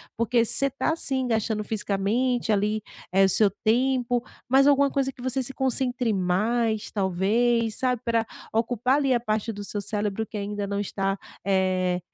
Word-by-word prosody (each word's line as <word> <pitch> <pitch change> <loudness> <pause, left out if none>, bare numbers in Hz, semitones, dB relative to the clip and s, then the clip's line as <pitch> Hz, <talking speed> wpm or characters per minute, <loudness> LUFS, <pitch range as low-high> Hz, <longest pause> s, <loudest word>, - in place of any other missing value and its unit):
porque 230 +1 +2
você 275 +5 +1
tá 275 +4 -1
assim, 265 -5 0
gastando 220 -2 0
fisicamente 220 +4 0
ali 210 +1 0 0.3
é 195 +1 +4
o - - +2
seu 205 +2 +4 0.2
tempo, 245 +1 +2 0.2
mas 270 +2 +5
alguma 280 -1 +4
coisa 270 -1 0
que 250 - -15
você 260 +1 -1
se 270 - -4
concentre 250 -3 0
mais, 215 +4 0
talvez 220 +4 +1
sabe 250 -3 0
pra 230 -1 +1 0.3
ocupar 240 +3 +1
ali 275 -3 +2
a 240 - +2
parte 220 -1 -1
do 205 -1 -7
seu 205 0 -4
cérebro, 210 +1 -2
que 215 - -7
ainda 205 0 -3
não 200 0 -2
está, 195 -1 -2 0.3
eh, 185 -2 +1
225 Hz, 170 wpm, -25 LUFS, 205-250 Hz, 0.3 s, mas